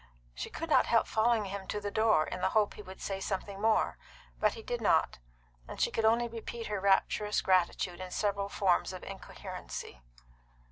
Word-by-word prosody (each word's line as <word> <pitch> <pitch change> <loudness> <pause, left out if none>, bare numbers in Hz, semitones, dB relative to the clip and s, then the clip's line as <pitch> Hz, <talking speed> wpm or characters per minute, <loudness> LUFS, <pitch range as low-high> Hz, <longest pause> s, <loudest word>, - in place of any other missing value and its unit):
She - - -5
could 330 - -5
not - - +5
help 230 - +4
following 225 -1 +2
him 195 0 -6
to 210 - -2
the 205 0 -4
door, 220 -8 +3
in 180 - -5
the - - +2
hope 210 -1 +3
that - - -12
he - - -7
would 190 -2 -11
say 195 -1 -3
something 195 0 -4
more, 220 0 +2 0.4
but 215 -1 +2
he 225 - -9
did 240 +1 -3
not, 210 - +2 0.5
and - - -8
she - - +2
could 225 - 0
only 235 +2 +4
repeat 230 0 -6
her 210 -2 -2
rapturous 200 +2 +2
gratitude 180 -1 +1
in 185 0 -6
several 200 +1 -1
forms 190 -2 +1
of 185 - -8
incoherency. 190 - -8
205 Hz, 195 wpm, -31 LUFS, 190-220 Hz, 0.5 s, not